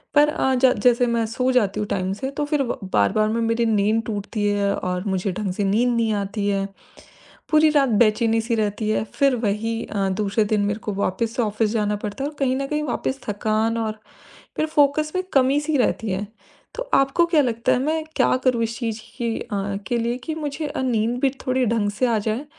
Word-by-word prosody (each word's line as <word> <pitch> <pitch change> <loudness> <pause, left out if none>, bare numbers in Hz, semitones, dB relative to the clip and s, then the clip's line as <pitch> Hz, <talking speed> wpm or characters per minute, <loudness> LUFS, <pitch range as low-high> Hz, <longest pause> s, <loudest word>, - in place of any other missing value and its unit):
पर 295 +1 +6
अ, 265 -3 +1
ज 255 0 +4
जैसे 245 0 +4
मैं 235 -1 +1
सो 250 +3 0
जाती 210 -6 +1
हूँ 210 - -2
टाइम 185 -1 -1
से, 265 +7 -4
तो 290 +1 -2
फिर 295 -1 0
व 250 - -3
बार-बार 215 - +3
में 230 +2 0
मेरी 230 +1 +1
नींद 220 +1 +2
टूटती 210 0 -3
है 205 -1 +1
और 180 0 -3
मुझे 190 0 -1
ढंग 200 0 -3
से 205 - -2
नींद 235 +5 +2
नहीं 225 -2 +1
आती 205 0 -2
है। 195 -1 0 0.8
पूरी 310 0 +5
रात 280 -3 +3
बेचैनी-सी 225 +1 +2
रहती 215 0 -1
है, 215 - +1
फिर 275 +2 +1
वही 225 +1 -1
अ, 200 -2 -1
दूसरे 205 +2 0
दिन 210 0 +1
मेरे 205 +1 -1
को 210 - -4
वापस 210 +4 -1
से 255 - +1
ऑफिस 215 0 0
जाना 210 -2 0
पड़ता 210 +5 -5
है 285 - -1
और 300 - -15
कहीं 260 -2 +1
न 275 0 -2
कहीं 300 +1 -1
वापस 270 -1 -2
थकान 215 +2 0
और 220 -1 -3 0.6
फिर 310 - +1
फ़ोकस 305 0 +2
में 370 - +1
कमी-सी 285 +3 +3
रहती 225 -3 0
है। 190 +2 -2 0.5
तो - - -3
आपको 275 +6 +3
क्या 330 -3 +3
लगता 230 -3 0
है, - - +3
मैं 310 +4 -1
क्या - - +3
करूँ 250 -3 +2
इस 225 0 -4
चीज़ 225 -3 -3 0.2
की 230 -2 -1
अ 230 - -6
अ, 195 0 -2
के 240 - 0
लिए 235 +1 -1
कि 315 - -2
मुझे 305 0 -4
अ, 265 - -3
नींद 235 -1 0
भी 275 - +3 0.2
थोड़ी 255 0 +2
ढंग 215 -2 +1
से 230 +5 0
आ 230 -2 +2
जाए 220 +6 -2
230 Hz, 220 wpm, -22 LUFS, 210-260 Hz, 0.8 s, पर